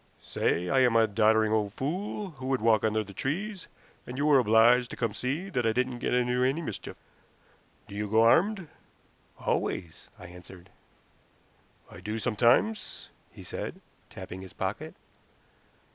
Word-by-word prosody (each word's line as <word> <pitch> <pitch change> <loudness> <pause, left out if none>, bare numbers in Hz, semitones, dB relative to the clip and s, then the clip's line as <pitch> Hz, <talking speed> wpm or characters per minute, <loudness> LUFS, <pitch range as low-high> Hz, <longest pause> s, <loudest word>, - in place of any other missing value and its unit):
Say 90 +2 -1
I 135 - +2
am 125 -3 +4
a 115 -1 +6
doddering 110 +1 +3
old 105 -2 0
fool 185 - -4
who 130 -4 -8
would 135 -1 +1
walk 110 -1 +3
under 110 0 +1
the 100 -1 -12
trees 185 - -4 0.4
and 125 - -7
you 145 - 0
were 145 -3 +6
obliged 120 +2 +4
to - - -7
come 115 - -1
to 100 - -9
see 145 +9 -2
that 125 -7 0
I 115 -1 +2
didn't 125 0 -1
get - - -2
into 125 0 +1
any 135 +5 +1
mischief. 110 - -6 0.9
Do - - -12
you 105 0 -3
go 110 +2 +4
armed?" 185 - +3 0.7
"Always," 85 -3 -3
I - - -12
answered. 90 +1 -13 1.2
"I - - -11
do 105 +1 -4
sometimes," 120 - +1 0.2
he - - -12
said, - - -6 0.3
tapping 95 +1 -9
his 95 -2 -11
pocket. - - -4
120 Hz, 160 wpm, -28 LUFS, 110-135 Hz, 1.2 s, a